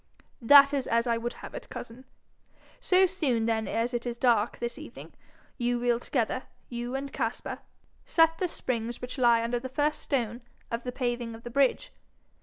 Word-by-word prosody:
'That 280 +4 +8
is 275 -3 -1
as 230 +1 +2
I 235 -1 +2
would 240 +1 -3
have - - -10
it, - - -8
cousin. 245 +2 -9 0.7
So 370 +1 +4
soon 285 -12 0
then 225 -1 0
as 230 +2 -1
it 240 0 -2
is 240 0 -3
dark 235 -3 +2
this 235 0 -4
evening, - - -11 0.5
you 245 0 +1
will 240 -1 +1
together, 255 0 -1 0.2
you 240 +1 -4
and 275 +1 -4
Caspar, - - -3 0.4
set 325 0 +3
the 365 - +1
springs 240 -7 -3
which 250 +2 -6
lie 235 -2 +5
under 240 +1 -1
the 260 +2 -6
first 295 +3 0
stone 240 -3 -2 0.3
of 230 0 -2
the 250 - -2
paving 240 -2 -2
of 225 - -13
the 240 - -7
bridge. 275 - +2
245 Hz, 185 wpm, -28 LUFS, 235-270 Hz, 0.7 s, That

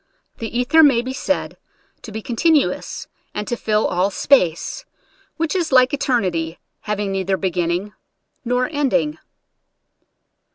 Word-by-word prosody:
The 225 - -4
ether 250 +6 +5
may 265 -6 +5
be 260 +1 -4
said 285 +2 -2 0.4
to 225 - -9
be 220 +1 -6
continuous, 295 +5 0 0.3
and 210 0 -3
to 240 - -1
fill 215 -2 0
all 185 +3 +1
space 185 - +2 0.3
— - - -36
which 330 +2 -1
is 340 -4 0
like 255 0 +5
eternity, 185 - 0 0.2
having 210 -2 -2
neither 190 0 0
beginning 180 +2 -1 0.5
nor 250 +1 +1
ending. 240 - 0
225 Hz, 130 wpm, -20 LUFS, 190-265 Hz, 0.5 s, ether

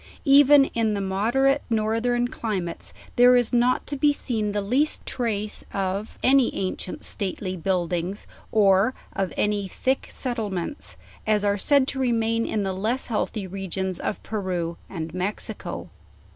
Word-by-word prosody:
Even 285 0 +7
in 220 -2 +1
the - - -1
mod 195 +5 -1
erate 275 +1 +4
northern 230 +2 +1
climates 195 -8 -4 0.3
there 245 +1 +7
is 245 -1 +2
not 245 +1 +3
to 285 - -3
be 290 +2 +4
seen 220 -7 -2
the 205 - -1
least 255 +10 0
trace 215 -4 -2
of 195 +2 -2
any 265 -1 +5
ancient 185 -1 -4
stately 190 -1 -2
buildings, 180 +1 -2 0.3
or 205 +2 +4 0.2
of 190 -3 -1
any 205 -1 0
thick 260 +8 -1
settlements, 220 - -4 0.3
as 210 -1 +2
are 200 0 +3
said 275 +6 +3
to 270 - -2
remain 230 -2 +1
in 210 -2 -1
the 190 -1 -1
less 220 +8 -1
healthy 210 -1 -1
regions 190 -1 -4
of - - -3
Peru 180 -5 -2
and 165 -3 -5
Mexico. 185 +3 -4
215 Hz, 145 wpm, -25 LUFS, 190-245 Hz, 0.3 s, Even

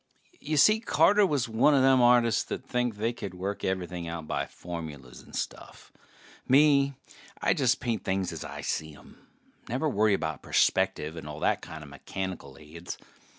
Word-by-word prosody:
Y'see, 155 +9 +4
Carter 210 -2 +4
was 140 -8 0
one 120 +6 +3
a 135 - +4
them 130 -1 +5
artists 120 -1 +4
that 130 - -5
think 125 -3 -1
they 110 +3 -1
can 95 -5 -7
work 100 +2 -4
everything 90 -2 -3
out 85 -1 -5
by - - -2
formulas 75 -8 -8
and - - -13
stuff. - - -6 0.6
Me, 140 0 +4 0.4
I - - +2
just 130 -2 +2
paint 115 -6 -2
things 95 -1 -1
as - - -6
I - - -7
see 80 -1 -3
'em. - - -18 0.4
Never 130 +7 0
worry 110 -6 +3
about 80 -5 -4
perspective 75 +2 +1
and 80 -2 -8
all 75 0 -7
that - - +1
kinda 80 -1 -9
mechanical 70 0 -6
aids. 80 +3 -9
100 Hz, 165 wpm, -28 LUFS, 80-130 Hz, 0.6 s, them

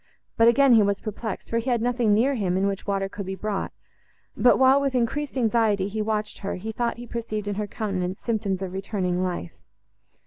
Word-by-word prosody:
But 230 - +5
again 265 +2 +6
he 225 - +7
was 200 -1 +1
perplexed, 215 0 -5
for 230 - +2
he 240 +3 -3
had 240 -1 +2
nothing 240 -1 +1
near 235 +7 +3
him, 190 -7 0
in 195 - +1
which 195 0 -3
water 195 -1 0
could 195 0 -7
be 190 - -3
brought; 210 0 -3 0.6
but 245 - +5
while, 265 +1 +5
with 275 -2 -1
increased 270 +4 -1
anxiety, 220 -5 +2
he 215 +2 -3
watched 215 0 -2
her, 200 - -3
he 215 +5 -5
thought 235 +1 -2
he 240 - -8
perceived 220 -3 -4
in 205 - -1
her 210 +1 -3
countenance 190 -3 -3
symptoms 200 -5 -2
of 185 -1 -5
returning 190 -2 -2
life. 180 - -3
215 Hz, 210 wpm, -25 LUFS, 195-235 Hz, 0.6 s, he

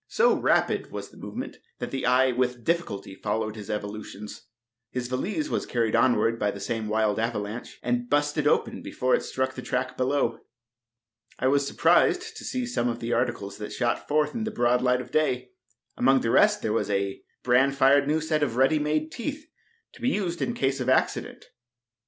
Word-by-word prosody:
So 475 +1 +3
rapid - - +1
was - - -6
the - - -17
movement - - -6 0.2
that - - -5
the 135 -2 -2
eye 130 +1 +4
with 125 -1 -1
difficulty 160 - -2
followed 110 +2 -2
his 105 -3 -9
evolutions. 105 0 -6 0.4
His 125 0 -3
valise 200 - -2
was - - -2
carried 115 -2 0
onward 115 -1 +3
by 105 - +1
the 100 - -5
same 110 +2 -3
wild 110 -1 +1
avalanche, 110 0 -3
and 120 0 -1
"busted" 145 0 +1
open - - +1
before 125 0 -1
it - - +3
struck 130 0 -2
the 125 - -7
track 130 0 -2
below. 130 -3 0 1.0
I 130 - 0
was 140 0 +2
surprised - - +3
to - - -8
see 255 -1 -2
some 240 - -1
of 120 0 -3
the 120 +1 -2
articles 120 -5 -2
that 105 - -6
shot 120 -2 -1
forth 150 0 +1
into 220 -1 -2
the - - -12
broad 120 +1 +3
light 125 0 +2
of - - -11
day. 125 -5 0 0.4
Among 135 +1 +4
the 115 - 0
rest 210 - +4
there 110 - 0
was 115 - 0
a 100 -1 -1 0.2
bran 130 +3 +4
fired 140 +1 +4
new 155 +2 +1
set 155 -1 0
of 130 -6 0
ready 135 +4 +3
made 155 +1 -1
teeth, 290 - -5 0.5
to - - -16
be 250 - +2
used 185 -8 -2
in 235 - -1
case 135 - 0
of 130 0 -1
accident. 130 - 0
125 Hz, 195 wpm, -26 LUFS, 115-145 Hz, 1.0 s, eye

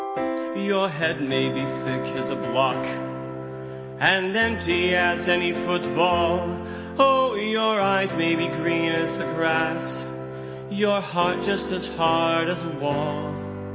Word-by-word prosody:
3. 65 - -3
Your 195 -1 +2
head 160 -2 -1
may 65 - +1
be 65 0 -3 0.2
thick 65 0 -2 0.2
as 65 0 -3
a - - -2
block, 65 0 0 1.2
And 190 +1 +4
empty 180 -6 +2
as 175 0 +2
any 175 0 +3
foot 175 0 -1
ball, 175 - +2 0.4
Oh! 265 -2 +5
your 220 +1 +1
eyes 195 0 +2
may 165 0 +2
be 165 0 0
green 165 0 0
as 165 0 -1
the - - -3
grass 160 - -1 0.7
Your 205 -1 +1
heart 175 -2 0
just 200 -1 -1
as 185 -1 -2
hard 165 0 +2
as 175 -2 -3
a 165 - -5
wall. 145 0 -3
170 Hz, 140 wpm, -23 LUFS, 145-190 Hz, 1.2 s, Oh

